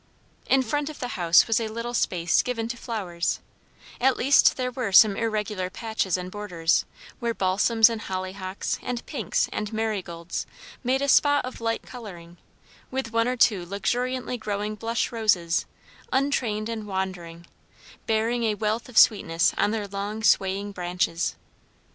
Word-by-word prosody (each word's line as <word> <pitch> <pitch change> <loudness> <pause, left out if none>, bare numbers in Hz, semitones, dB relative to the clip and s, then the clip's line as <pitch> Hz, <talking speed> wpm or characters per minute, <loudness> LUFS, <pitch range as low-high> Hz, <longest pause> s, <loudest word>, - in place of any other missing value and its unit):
In 265 -1 +4
front 290 +5 -1
of 305 - -9
the 245 - -4
house 170 -4 +4
was 225 0 +2
a 225 - -2
little 230 +2 -5
space 175 -7 +2
given 230 -3 -3
to 240 - -3
flowers; 190 -8 -3 0.6
at 265 +1 +3
least 275 +3 +5
there 250 -1 -1
were 245 -5 -3
some 200 +1 +7
irregular 210 -4 -2
patches 220 -3 -2
and 180 0 -6
borders, 180 -6 0 0.3
where 235 -2 -2
balsams 205 +4 +4
and 230 -2 -3
hollyhocks 185 0 -4
and 245 -1 -4
pinks - - -1
and 210 0 -3
marigolds 195 -7 -3 0.4
made 260 +2 +1
a - - 0
spot 290 0 +4
of 255 -2 -8
light 230 0 -1
colouring; 175 -8 -10 0.5
with 260 -3 -4
one 230 +1 +2
or 250 0 -1
two 210 -6 +3
luxuriantly 245 +7 -2
growing 210 0 -3
blush 230 +3 -2
roses, 200 -8 +1 0.4
untrained 250 -6 0
and 225 -2 -5
wandering, 180 -3 -4 0.6
bearing 230 +2 +1
a 215 -1 +1
wealth 215 +4 -2
of 235 - -8
sweetness 175 -6 +4
on - - +2
their 210 -1 -2
long, 205 +2 -5
swaying 200 0 +2
branches. 180 -2 -1
215 Hz, 155 wpm, -25 LUFS, 185-235 Hz, 0.6 s, some